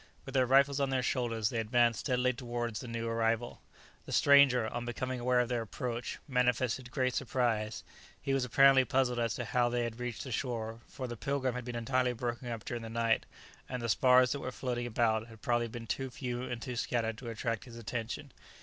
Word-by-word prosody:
With 135 - -8
their 130 -2 +3
rifles 140 +2 +4
on 140 -1 +1
their 130 -1 0
shoulders, 115 -4 0
they 115 - -2
advanced 120 +1 +2
steadily 125 -1 +1
towards 120 -2 -3
the 125 - -7
new 115 0 -3
arrival. 115 +1 0 0.5
The - - -7
stranger, 140 -5 +6
on 120 +2 -4
becoming 125 +2 -3
aware 125 +1 +2
of 120 - -1
their 120 -2 0
approach, 120 +2 -4
manifested 125 -1 +1
great 130 -1 0
surprise; 120 -5 -1 0.4
he 135 -1 -1
was 135 -1 +2
apparently 135 +2 +6
puzzled 130 -2 +1
as 115 -1 0
to 120 - -3
how 120 +1 +2
they 120 0 0
had 115 0 -4
reached 125 -2 -4
the 130 - -7
shore, 115 -2 -3
for 130 - -6
the 120 -1 -5
"Pilgrim" 135 0 -1
had 125 -1 -5
been 120 -1 -5
entirely 125 +1 +1
broken 120 +1 -4
up 115 -2 -5
during 120 -1 -4
the 115 - -7
night, 115 0 +1 0.4
and 125 - -3
the 120 - -3
spars 125 +1 +5
that 140 - -1
were 130 - -4
floating 120 -1 -3
about 110 -1 +1
had 115 -2 -15
probably 120 -1 +1
been 115 0 -7
too 135 +3 -2
few 125 -1 -4
and 120 -2 -4
too 125 -3 -4
scattered 115 -2 -1
to 120 - -6
attract 115 -1 -3
his 120 -2 -11
attention. 115 +4 -5
120 Hz, 215 wpm, -32 LUFS, 115-130 Hz, 0.5 s, stranger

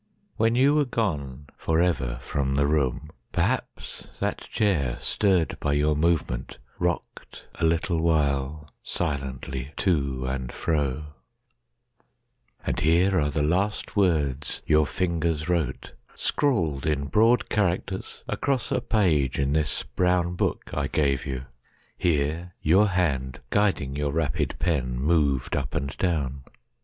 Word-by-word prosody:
When 115 +1 +2
you 135 +3 +5
were 150 -1 +3
goneForever 75 - -1
from 70 +1 -1
the 70 +1 +3
room, 75 0 0 0.2
perhaps - - -2
that - - -1
chair, 80 - 0
Stirred 95 -6 +1
by 70 - 0
your 75 +1 +2
movement, 75 -6 0 0.2
rocked 85 -1 -3
a - - +2
little 85 +1 +1
while, 75 -2 0
Silently, 70 -3 -3
to 70 -8 0
and 65 -1 -3
fro…And 75 -2 -1 1.7
here 90 +4 +3
are 75 - +1
the 75 0 0
last 95 +7 0
words 75 -8 +1
your 75 -1 +4
fingers 85 -3 -1
wrote, 80 -7 -1 0.2
Scrawled 85 - +1
in 75 -2 0
broad 115 +8 +3
characters 95 -1 -1
across 135 -4 -1
a 130 -2 +1
pageIn 75 - +1
this 75 -3 0
brown 90 +7 +1
book 90 - -2
I - - 0
gave 70 -3 0
you. 65 0 -4 0.5
Here 80 +2 0
your 95 +7 +4
hand, 70 -8 0
Guiding 95 -10 +1
your 75 0 -1
rapid 75 -3 -1
pen, 65 -7 0
moved 70 -3 +1
up 70 -3 -3
and 70 0 -2
down. 70 -7 0
75 Hz, 120 wpm, -26 LUFS, 70-90 Hz, 1.7 s, you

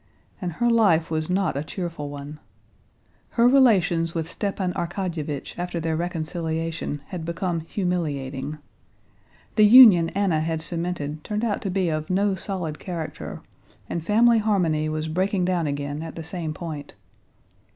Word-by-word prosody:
And 175 -3 -3
her 240 +8 0
life 200 -9 +3
was 155 0 -1
not 190 -2 +1
a 140 - -2
cheerful 165 -3 -5
one. 145 +1 -8 1.0
Her 235 +1 +6
relations 185 -11 +4
with 165 -1 -3
Stepan 195 -3 -2
Arkadyevitch 170 -5 -3
after 175 -1 -3
their 160 -1 -1
reconciliation 165 -2 -3
had 180 -3 -5
become 170 +1 -2
humiliating. 150 -6 -3 1.0
The 215 - +7
union 205 -8 +9
Anna 195 -6 +2
had 160 0 -1
cemented 160 -2 -4
turned 210 +2 -2
out 210 -3 -1
to 195 - -3
be 185 -2 0
of 155 -1 -3
no 195 +2 +2
solid 180 -5 -4
character, 170 -4 -6 0.4
and 170 - -3
family 230 +5 +4
harmony 170 -8 +1
was 155 0 -2
breaking 185 +3 0
down 175 -3 0
again 145 +1 -3
at 165 0 -7
the 165 - -6
same 160 -1 -4
point. 155 -2 -7
170 Hz, 145 wpm, -24 LUFS, 155-190 Hz, 1.0 s, union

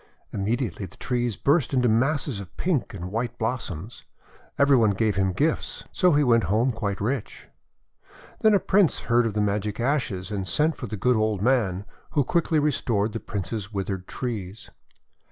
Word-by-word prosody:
Immediately 100 - -2
the - - -17
trees 120 -3 -1
burst 140 -2 +2
into 125 -1 +3
masses 130 +1 +1
of 100 -1 -11
pink 165 - -1
and 90 -1 -6
white 120 +2 -2
blossoms. 110 -4 -4 0.5
Every 140 -1 +5
one 110 -5 +4
gave 110 -2 +1
him 95 -1 +1
gifts, 150 - -1
so 180 -3 +3
he 145 0 +4
went 115 -5 +4
home 110 +8 +2
quite 105 -4 -3
rich. 115 +3 -3 0.9
Then 215 -1 +5
a - - +4
Prince 190 -4 +3
heard 120 0 +2
of 110 - -3
the 105 - +2
magic 105 +1 -1
ashes, 120 - -1
and 100 -2 -3
sent 155 - +2
for 125 - -6
the 110 - -5
good 125 +5 +2
old 110 -2 0
man, 105 -7 +1 0.3
who 145 - +5
quickly 165 +2 +1
restored 115 -8 +1
the 115 - -3
Prince's 105 0 -4
withered 95 -2 -3
trees. 110 -5 -5
115 Hz, 170 wpm, -25 LUFS, 100-130 Hz, 0.9 s, Every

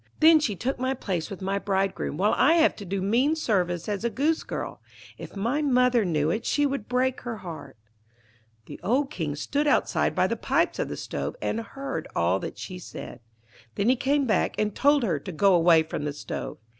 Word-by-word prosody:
Then 315 0 +7
she 230 -9 -1
took 245 +10 -3
my 260 +1 0
place 180 -8 -3
with 195 -2 -7
my 195 +1 0
bridegroom, 195 -5 -1
while 205 +4 +2
I 300 +5 +5
have 330 -2 +4
to 205 - -8
do 190 +1 -2
mean 250 +10 +2
service 180 - 0
as 205 0 -2
a 235 - +1
Goosegirl. 295 +8 -2 0.4
If - - -9
my 235 +9 0
mother 250 -4 +3
knew 155 -3 +1
it 220 +6 -2
she 290 +3 +1
would 275 -6 -3
break 255 +1 0
her 235 -3 -5
heart.' 175 - -9 0.9
The - - -10
old 270 +6 +1
King 155 -5 -3
stood 285 - -1
outside 290 - +2
by - - +3
the - - 0
pipes - - 0
of - - -1
the - - -5
stove, - - -4
and 225 - -2
heard 230 - -5
all 85 +3 +2
that - - -6
she 180 - -7
said. 175 - -9 0.6
Then 200 +4 +1
he 255 - +5
came 280 +2 +1
back, 220 - +1
and 210 -1 0
told 285 -1 +3
her 170 -10 0
to 185 - -7
go 190 +4 +3
away 165 -2 +5
from 155 -2 -5
the 145 - -2
stove. 145 - -6
210 Hz, 205 wpm, -26 LUFS, 180-265 Hz, 0.9 s, Then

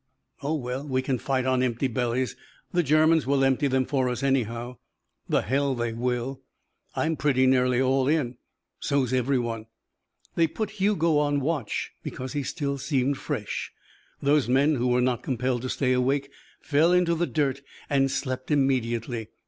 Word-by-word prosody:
"Oh, 150 +3 -1
well, 130 0 -4
we 130 -1 0
can 130 -2 -1
fight 130 0 -1
on 130 -1 +2
empty 125 +1 0
bellies. 125 -1 -1 0.4
The 175 - +2
Germans 155 0 +3
will 140 -1 +3
empty 135 +2 +2
them 130 -1 +1
for 130 -2 0
us 125 +2 -3
anyhow." 120 -2 -1 0.5
"The - - +2
hell 135 +2 +1
they 120 -1 -2
will." 125 +3 -2 0.5
"I'm 160 0 0
pretty 135 -3 +2
nearly 125 -1 +3
all 130 0 +2
in." 140 -5 0 0.4
"So's 135 -3 0
everyone." 120 -3 0 0.7
They 165 -1 +3
put 215 +6 -4
Hugo 170 -6 +3
on 145 -1 +1
watch 140 -6 -2
because 130 +1 -6
he 145 - -1
still 140 -1 -3
seemed 135 -1 0
fresh. - - -4 0.5
Those 140 -3 +3
men 140 +4 +4
who 125 -3 0
were 125 0 +3
not 125 -1 +1
compelled 125 -1 -1
to 130 - -4
stay 130 -1 +1
awake 135 +2 0 0.3
fell 155 +3 +3
into 180 -1 +3
the 170 +1 0
dirt 140 -3 0 0.3
and 135 -1 +2
slept 130 -1 -3
immediately. 120 -5 0
130 Hz, 165 wpm, -26 LUFS, 125-145 Hz, 0.7 s, men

